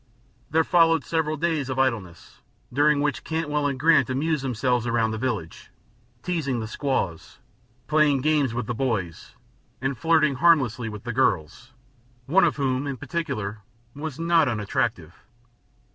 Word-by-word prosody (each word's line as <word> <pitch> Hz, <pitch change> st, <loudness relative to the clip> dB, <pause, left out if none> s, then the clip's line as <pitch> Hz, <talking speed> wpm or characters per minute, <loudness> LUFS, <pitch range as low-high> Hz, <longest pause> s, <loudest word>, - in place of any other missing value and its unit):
There 160 Hz, +1 st, +3 dB
followed 165 Hz, -3 st, +3 dB
several 155 Hz, -1 st, -1 dB
days 155 Hz, -4 st, -1 dB
of 130 Hz, -, -3 dB
idleness, 115 Hz, -10 st, -2 dB, 0.3 s
during 145 Hz, +2 st, +3 dB
which 145 Hz, -1 st, -1 dB
Cantwell 150 Hz, -3 st, -1 dB
and 135 Hz, -2 st, -3 dB
Grant 150 Hz, -4 st, +4 dB
amused 145 Hz, +2 st, -1 dB
themselves 125 Hz, -1 st, 0 dB
around 115 Hz, -1 st, +1 dB
the 110 Hz, -, -4 dB
village, 110 Hz, -10 st, -4 dB, 0.5 s
teasing 150 Hz, -9 st, -1 dB
the 110 Hz, -, -4 dB
squaws, 110 Hz, -, -3 dB, 0.5 s
playing 150 Hz, -3 st, +3 dB
games 150 Hz, -3 st, +2 dB
with 120 Hz, 0 st, -3 dB
the 120 Hz, -, -3 dB
boys, 110 Hz, -10 st, -3 dB, 0.4 s
and 135 Hz, +1 st, -2 dB
flirting 155 Hz, 0 st, +2 dB
harmlessly 130 Hz, -8 st, +3 dB
with 105 Hz, -1 st, -8 dB
the 120 Hz, 0 st, -4 dB
girls, 120 Hz, -, -1 dB, 0.5 s
one 180 Hz, +9 st, +4 dB
of 165 Hz, -, +1 dB
whom, 135 Hz, -1 st, -1 dB
in 135 Hz, -2 st, -4 dB
particular, 120 Hz, -, -4 dB, 0.3 s
was 150 Hz, 0 st, -6 dB
not 165 Hz, -2 st, +3 dB
unattractive. 105 Hz, -6 st, -2 dB
135 Hz, 145 wpm, -24 LUFS, 115-155 Hz, 0.5 s, Grant